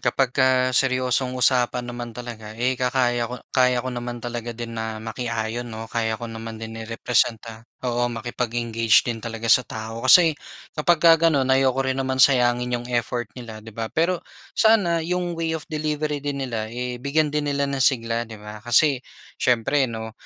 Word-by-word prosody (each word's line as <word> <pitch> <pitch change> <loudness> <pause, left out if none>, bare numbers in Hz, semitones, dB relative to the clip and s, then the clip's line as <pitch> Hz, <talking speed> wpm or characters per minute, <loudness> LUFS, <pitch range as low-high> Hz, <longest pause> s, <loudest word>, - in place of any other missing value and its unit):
Kapagka 130 0 +2
seryosong 130 0 +1
usapan 125 -1 +2
naman 120 -1 -6
talaga 115 -3 -8
eh, 125 +2 +1
kakaya 125 -2 +1
ko 125 0 -7
kaya 125 -1 +3
ko - - -2
naman 120 0 -5
talaga 120 -1 -5
din 120 -1 -6
na 110 0 -3
makiayon 115 +1 -3
'no, 110 0 -6
kaya 110 -1 0
ko 120 - -7
naman 115 0 -7
din 115 0 -7
i-representa 115 0 -1
oo, 120 -1 -1
makipag-engage 115 -1 +1
din 115 -1 -4
talaga 115 0 -4
sa 125 +3 +6
tao. 110 +1 -7
Kasi 160 +3 +7 0.4
kapagka 165 +1 +5
gano'n 150 -5 +2
ayoko 130 0 +3
rin 130 0 0
naman 130 0 -1
sayangin 125 -2 +4
'yong 120 0 -8
effort 120 0 -1
nila, 115 -4 -9
'di 110 - -10
ba? 115 +1 -4
Pero 170 +2 +1 0.4
sana 200 -7 +4
'yong 175 +1 -2
way 165 -1 -1
of 150 - -8
delivery 150 -1 -2
din 140 -1 -3
nila 110 -3 -3
eh, 125 +1 -4
bigyan 150 +2 +1
din 150 -1 -1
nila 140 0 0
ng 140 -1 -2
sigla, 115 -3 +1
'di 110 - -9
ba? 105 0 -9
Kasi 130 +3 +3 0.4
siyempre 130 +3 +2
'no, 110 -1 -6
125 Hz, 170 wpm, -23 LUFS, 115-135 Hz, 0.4 s, Kasi